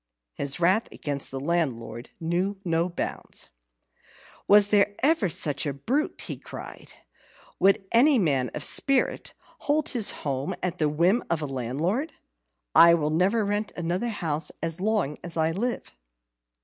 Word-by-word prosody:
His 140 +3 -1
wrath 185 +7 +2
against 140 -2 -4
the 135 - -5
landlord 135 -7 -2
knew 180 +4 -1
no 165 +1 0
bounds. 175 - -5 1.0
"Was 205 0 +6
there 205 -1 +3
ever 285 - +3
such 145 -2 +1
a 140 - -2
brute?" 255 - -2
he - - -5
cried. - - -10 0.7
"Would 195 0 +3
any 265 +4 +5
man 140 - +1
of 150 - -2
spirit 275 - +2 0.3
hold 300 0 0
his 235 -6 +3
home 135 -1 -3
at 180 -1 -2
the 155 -2 +2
whim 175 +10 +2
of 165 -2 -1
a - - -1
landlord? 145 - -2 0.6
I'll 170 -3 +6
never 195 +7 +2
rent 205 +1 -2
another 180 +7 -2
house 160 -7 -2
as 165 +2 -3
long 200 -8 -1
as 170 -1 -4
I 160 0 +2
live." 235 - -4
175 Hz, 145 wpm, -26 LUFS, 150-205 Hz, 1.0 s, Was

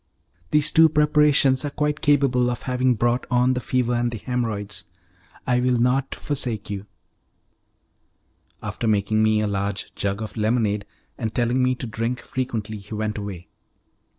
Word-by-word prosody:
'" 85 0 -37
"Those 150 -1 +3
two 160 0 +6
preparations 150 -3 +4
are 145 - -2
quite 150 +1 -1
capable 135 -5 +3
of 120 - -4
having 125 -1 +1
brought 120 +3 0
on 125 +1 +3
the 125 - -1
fever 125 -1 0
and 120 0 +1
the 120 - -5
haemorrhoids. 105 -6 -3 0.6
I 125 -2 +2
will 125 0 +2
not 125 +3 +1
forsake 120 -8 -3
you" 100 0 -5 1.8
After 115 - -3
making 110 0 +2
me 110 0 +3
a 105 - 0
large 100 0 -3
jug 100 +2 -2
of 110 - -7
lemonade, 105 -2 0 0.3
and 110 -3 -3
telling 120 +1 +1
the 130 0 +2
to 125 - -6
drink 115 +2 -2
frequently, 110 -4 -4
he 100 +2 -8
went 105 0 -2
away. 95 -4 -7
120 Hz, 160 wpm, -23 LUFS, 105-130 Hz, 1.8 s, two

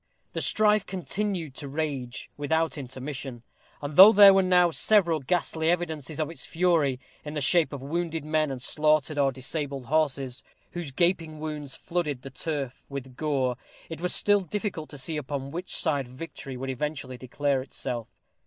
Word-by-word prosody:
The - - -2
strife 210 -1 +3
continued 185 -4 -3
to 145 - -5
rage 140 -4 -4
without 160 +3 0
intermission; 130 -2 -6 0.4
and 145 +1 -4
though 195 +5 +11
there 200 -2 +9
were 195 - +5
now 180 -2 +4
several 170 -3 +3
ghastly 160 +2 0
evidences 160 -4 -2
of 155 0 -1
its 165 - -6
fury, 160 -7 +1 0.2
in 150 0 -6
the - - 0
shape 165 +3 +3
of 140 -3 -6
wounded 165 +1 -2
men 155 -1 +1
and 135 -2 -4
slaughtered 150 +1 +1
or 135 -1 +3
disabled 135 0 -3
horses, 135 -3 0 0.3
whose 175 -4 -5
gaping 165 0 0
wounds 150 -3 -5
flooded 150 -7 -3
the 135 - -8
turf 135 -2 -4
with 135 -2 -7
gore, 130 -4 0 0.3
it 165 0 -6
was 180 - 0
still 205 0 +4
difficult 185 -3 -4
to 145 - -9
see 155 +4 -2
upon 140 -1 -4
which 175 +4 -4
side 140 -4 0
victory 135 0 -8
would 135 +1 -3
eventually 135 -1 -4
declare 140 +2 0
herself. 125 -3 -4
150 Hz, 165 wpm, -27 LUFS, 135-170 Hz, 0.4 s, though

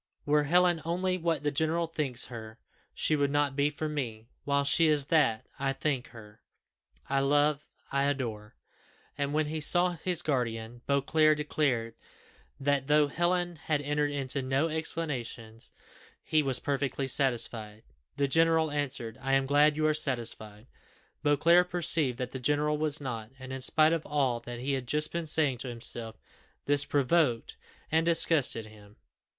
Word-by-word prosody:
Were 150 0 +2
Helen 175 +1 +3
only 185 +2 -1
what 165 -4 -1
the 145 - 0
general 160 +4 0
thinks 145 -7 -3
her, 110 -2 -9 0.4
she 155 - +1
would 145 -1 +1
not 145 -1 0
be 145 +1 +2
for 155 +1 -4
me; 120 -8 -4 0.2
while 140 0 +1
she 150 +4 +3
is 150 -3 +2
what 135 -9 +3 0.2
I 135 0 0
think 135 -3 -2
her, 105 -3 -14 0.7
I 135 0 +1
love 145 +1 +1 0.2
I 140 0 +1
adore!" 115 -7 -3 0.6
And 140 0 -2
when 155 +1 +1
he 155 +1 -4
saw 175 +4 +3
his 175 0 -3
guardian, 120 -4 -2
Beauclerc 155 +2 +3
declared 135 -6 -1 0.7
that, 140 -1 0
though 150 0 +4
Helen 175 +2 0
had 155 -1 -1
entered 150 0 0
into 140 -1 -2
no 135 +5 0
explanations, 130 -8 -4 0.5
he 155 - +2
was 135 -3 +1
perfectly 140 -1 -2
satisfied. 115 -5 -1 0.3
The 140 0 +1
general 160 +1 +3
answered, 135 -6 -3
"I 135 +1 -1
am 135 0 +3
glad 145 +2 +4
you 155 - +1
are 155 - +3
satisfied." 115 -7 -1 0.6
Beauclerc 170 +5 +4
perceived 160 -7 +3
that 125 -1 -4
the 130 - -6
general 150 +3 0
was 150 -2 0
not; 115 -6 -5
and 130 0 -8
in 130 - -5
spite 155 +4 +3
of 165 -2 -3
all 135 -5 0
that 120 0 -8
he 135 +4 -2
had 130 -2 -3
just 150 +3 0
been 170 -1 -3
saying 150 -5 +1
to 130 - -5
himself, 115 -1 -5 0.5
this 145 0 +2
provoked 140 -4 +1 0.4
and 160 +1 +3
disgusted 160 -8 +3
him. 105 -1 -16
145 Hz, 160 wpm, -29 LUFS, 125-155 Hz, 0.7 s, though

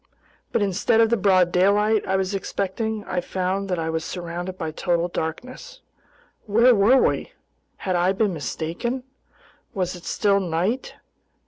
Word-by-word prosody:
But 220 - +1
instead 200 +3 +1
of 225 0 +4
the - - +5
broad 185 -4 +3
daylight 205 +4 +3
I 190 - +1
was 190 +1 -1
expecting, 205 +3 -3
I 180 -2 -2
found 190 +2 -2
that 180 - 0
I 160 0 -2
was 160 0 -2
surrounded 175 +2 -5
by 160 -3 -3
total 175 +2 0
darkness. 255 - -6 0.7
Where 230 +4 +5
were 220 +5 +5
we? - - +1 0.4
Had 185 -2 -2
I 175 +2 +3
been 200 0 0
mistaken? 170 - -3 0.7
Was 185 -2 -1
it 175 - -12
still 200 -2 +2
night? 185 +7 -2
190 Hz, 150 wpm, -23 LUFS, 175-215 Hz, 0.7 s, the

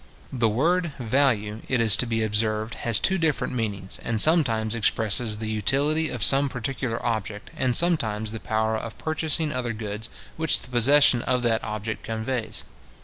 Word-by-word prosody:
The 120 -3 +1
word 165 +8 -1
VALUE, 110 -4 -1
it 130 - 0
is 110 -3 +9
to 125 - +2
be 115 -1 -1
observed, 110 +1 -1
has 115 -2 +2
two 190 -1 +3
different 160 -5 -2
meanings, 100 -5 -4
and 115 -2 -2
sometimes 115 -8 +3
expresses 110 0 0
the 110 0 -6
utility 140 +9 0
of 120 -4 -2
some 140 +1 +5
particular 125 -1 -5
object, 110 -3 -4
and 125 -2 0
sometimes 110 -12 +1
the 110 - -7
power 110 0 -2
of 110 +1 -7
purchasing 155 0 0
other 120 -2 -3
goods 105 0 -6 0.3
which 160 0 +1
the - - -11
possession 130 +1 +5
of 125 0 -1
that 115 -2 0
object 110 +1 -5
conveys. 115 +1 -4
115 Hz, 165 wpm, -23 LUFS, 110-135 Hz, 0.3 s, is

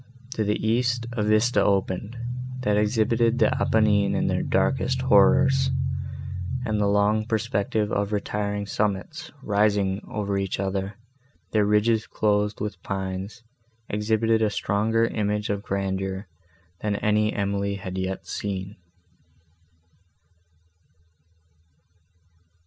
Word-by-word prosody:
To 110 - 0
the 105 0 0
east, 120 +1 +1
a 120 -2 -2
vista 110 0 +3
opened, 100 +3 0 0.4
that 105 -4 +1
exhibited 115 +2 +2
the - - +3
Apennines 105 -2 +3
in - - +1
their - - +1
darkest - - +1
horrors; 135 0 +5 1.0
and 105 -1 0
the 100 - +3
long 105 +2 +3
perspective 110 -2 0
of 100 0 0
retiring 105 0 -2
summits, 105 +8 -2
rising 100 -2 +1
over 100 -2 -1
each 95 -1 -2
other, 95 +1 -2 0.6
their 105 -2 +2
ridges 105 +1 +2
clothed 105 0 0
with 105 -4 -4
pines, 95 +3 -4 0.5
exhibited 110 +2 +1
a 110 - +3
stronger 110 +3 +1
image 105 -2 -1
of 100 -1 -2
grandeur, 95 0 -2 0.5
than 105 -1 -1
any 105 +1 +2
that - - -5
Emily 100 0 -1
had 95 -1 -6
yet 95 0 -3
seen. 95 0 -4
105 Hz, 115 wpm, -25 LUFS, 100-110 Hz, 1.0 s, horrors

